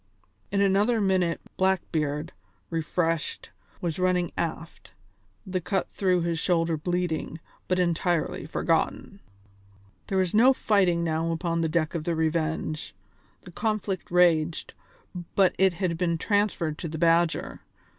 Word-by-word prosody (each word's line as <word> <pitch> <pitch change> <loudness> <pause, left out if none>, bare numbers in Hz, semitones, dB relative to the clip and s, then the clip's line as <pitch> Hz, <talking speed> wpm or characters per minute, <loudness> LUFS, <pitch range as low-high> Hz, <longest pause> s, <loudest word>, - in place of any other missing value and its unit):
In 200 - +1
another 205 +4 +3
minute 185 -4 +1 0.2
Blackbeard, 165 -5 0 0.4
refreshed, 165 0 -1 0.3
was 170 -1 -2
running 180 -2 +1
aft, 165 0 -5 0.5
the 185 -1 -2
cut 190 +2 -2
through 185 -3 +1
his 170 -1 -1
shoulder 165 -2 +1
bleeding, 170 0 -2 0.3
but 185 - +1
entirely 175 -3 0
forgotten. 165 +5 -1 0.9
There 195 - -1
was 185 -2 +1
no 245 +5 +6
fighting 190 -8 +2
now 165 0 0
upon 165 0 -1
the 160 - 0
deck 155 0 0
of 165 -2 -3
the 170 - 0
Revenge; 160 - -2 0.5
the 175 - -12
conflict 210 -1 -2
raged, 170 -2 +2 0.6
but 190 -2 +4
it 190 -1 +4
had 170 -2 -2
been 170 -2 +1
transferred 185 -5 0
to 170 - -4
the 160 0 -5
Badger. 165 0 +1
170 Hz, 130 wpm, -26 LUFS, 165-185 Hz, 0.9 s, no